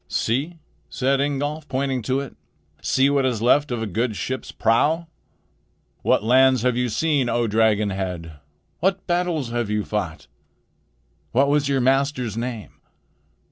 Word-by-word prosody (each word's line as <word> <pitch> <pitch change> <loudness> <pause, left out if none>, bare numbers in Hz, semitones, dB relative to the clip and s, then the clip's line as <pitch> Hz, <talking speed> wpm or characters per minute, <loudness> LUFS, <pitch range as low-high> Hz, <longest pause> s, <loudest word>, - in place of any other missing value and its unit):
"See," 140 +9 -1 0.3
said 135 +1 +1
Ingolf, 145 +2 -2
pointing 130 -1 -1
to 130 +4 -1
it, 140 - -9 0.5
"see 135 +1 +2
what 140 -1 +2
is 125 -4 0
left 140 +6 +3
of 120 -2 -2
a - - -1
good 110 +3 -1
ship's 130 +5 -4
prow! 150 +9 +2 1.0
What - - +2
lands 130 +1 +4
have 125 -1 +2
you 125 0 0
seen, 140 +2 +1
O 120 0 +1
dragon's 110 -1 +2
head? 85 -5 -5 0.4
What 190 +2 0
battles 175 -8 -1
have 120 -3 -2
you 105 0 0
fought? 85 -8 -4 1.1
What 140 +3 +3
was 145 -1 +2
your 135 -2 +1
master's 130 -3 +1
name? 115 -2 -6
125 Hz, 145 wpm, -23 LUFS, 110-140 Hz, 1.1 s, lands